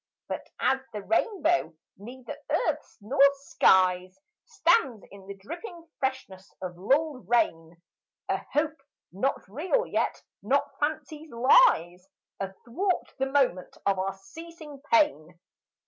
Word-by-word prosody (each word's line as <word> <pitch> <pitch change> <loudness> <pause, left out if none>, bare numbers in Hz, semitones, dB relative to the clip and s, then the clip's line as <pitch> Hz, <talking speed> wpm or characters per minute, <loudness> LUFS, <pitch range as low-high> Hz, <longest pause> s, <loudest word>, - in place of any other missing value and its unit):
But - - -5
as 265 - +2
the 210 -2 -5
rainbow, 340 - +1 0.2
neither 240 +5 -9
earth's - - -1
nor 250 +7 0
sky's, 185 -8 +2 0.3
Stands 335 - +2
in 195 -1 -13
the 200 - -7
dripping 335 - -9
freshness 230 -8 -4
of 180 -1 -6
lulled 270 - 0
rain, 170 -8 +1 0.5
A - - +1
hope, 300 0 0 0.3
not 200 +7 -2
real 360 - 0
yet - - -1 0.2
not 265 +8 +1
fancy's, 310 +1 -3
lies 230 - +4 0.3
Athwart 235 - -3
the 270 - +1
moment 265 -10 0
of 195 -1 +2
our 195 +1 -2
ceasing 310 +6 -12
pain. 295 - +2
260 Hz, 115 wpm, -27 LUFS, 190-315 Hz, 0.5 s, lies